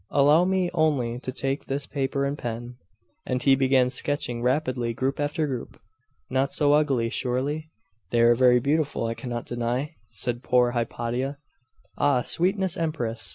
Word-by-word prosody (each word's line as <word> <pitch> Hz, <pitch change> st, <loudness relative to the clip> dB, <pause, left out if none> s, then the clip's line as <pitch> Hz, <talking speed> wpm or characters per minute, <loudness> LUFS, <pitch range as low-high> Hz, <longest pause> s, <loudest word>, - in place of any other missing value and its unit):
Allow 145 Hz, +5 st, +4 dB
me 185 Hz, -1 st, +1 dB
only 140 Hz, -8 st, +1 dB
to 130 Hz, -, -5 dB
take 135 Hz, +2 st, -3 dB
this 140 Hz, +1 st, -3 dB
paper 140 Hz, 0 st, -1 dB
and 140 Hz, +1 st, -1 dB
pen 120 Hz, -1 st, -6 dB, 0.2 s
' -, -, -44 dB
And 125 Hz, -1 st, -1 dB
he 135 Hz, -, +5 dB
began 130 Hz, -1 st, +3 dB
sketching 125 Hz, -2 st, -1 dB
rapidly 125 Hz, -2 st, 0 dB
group 135 Hz, +3 st, -1 dB
after 145 Hz, +2 st, 0 dB
group. 130 Hz, -5 st, -5 dB, 0.5 s
'Not 135 Hz, +1 st, 0 dB
so 145 Hz, -1 st, +3 dB
ugly, 135 Hz, -6 st, +2 dB
surely?' 140 Hz, +5 st, -2 dB, 0.4 s
'They 120 Hz, +2 st, +2 dB
are 120 Hz, 0 st, +6 dB
very 125 Hz, 0 st, +5 dB
beautiful, 145 Hz, -1 st, 0 dB
I 115 Hz, -, -1 dB
cannot 120 Hz, -1 st, -5 dB
deny,' 120 Hz, +4 st, -2 dB, 0.2 s
said 120 Hz, 0 st, -2 dB
poor 125 Hz, -1 st, +3 dB
Hypatia. 120 Hz, +3 st, -2 dB, 0.6 s
'Ah, 140 Hz, -4 st, +3 dB
sweetest 190 Hz, 0 st, +1 dB
Empress! 125 Hz, -9 st, -1 dB
130 Hz, 155 wpm, -25 LUFS, 120-145 Hz, 0.6 s, are